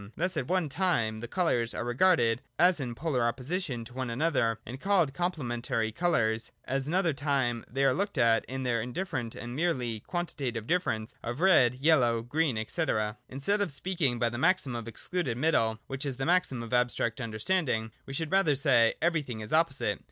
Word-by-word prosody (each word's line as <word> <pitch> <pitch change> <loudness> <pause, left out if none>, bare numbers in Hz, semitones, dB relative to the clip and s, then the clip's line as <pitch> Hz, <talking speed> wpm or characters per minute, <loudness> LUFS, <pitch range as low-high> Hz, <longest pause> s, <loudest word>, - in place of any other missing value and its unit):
Thus 180 +2 0
at 125 - -2
one 185 -3 +1
time 135 -9 0
the 120 - -6
colours 120 -7 0
are - - -2
regarded 120 -3 +3 0.2
as 175 0 +4
in 125 -4 -4
polar 145 -2 -1
opposition 130 +1 -2
to 120 - -13
one 130 -1 -3
another, 115 -4 +1
and 130 +4 -8
called 190 -8 +2
complementary 120 -9 -2
colours: 115 -7 0
at 135 +1 -2
an 165 - -1
other 180 -4 +2
time 135 -5 0
they 135 +3 -1
are 135 - +4
looked 200 +3 -2
at 115 -2 +4
in 130 0 -5
their 120 -3 0
indifferent 125 -1 -4
and 120 +1 -6
merely 130 -9 -1
quantitative 135 - -4
difference 115 -9 -1
of 120 +4 -4
red, 160 -10 +5
yellow, 125 -5 +3
green, 145 +2 0
&c. 165 - -1
(2) 110 -8 0 0.2
Instead 145 +11 -1
of 200 - +1
speaking 145 -3 -1
by 120 0 +1
the 120 +1 -5
maxim 160 -6 +2
of 115 -1 -5
Excluded 130 +1 -3
Middle 115 -7 +2
(which 135 +1 -5
is 135 -3 -3
the 135 - -2
maxim 170 -8 +1
of 115 - -7
abstract 125 0 +1
understanding) 115 0 -1 0.2
we 135 - -6
should 160 +2 -3
rather 190 -7 +3
say: 125 -5 +4
Everything 150 -9 0
is 105 - -7
opposite. 160 -3 +1
130 Hz, 190 wpm, -29 LUFS, 120-165 Hz, 0.2 s, red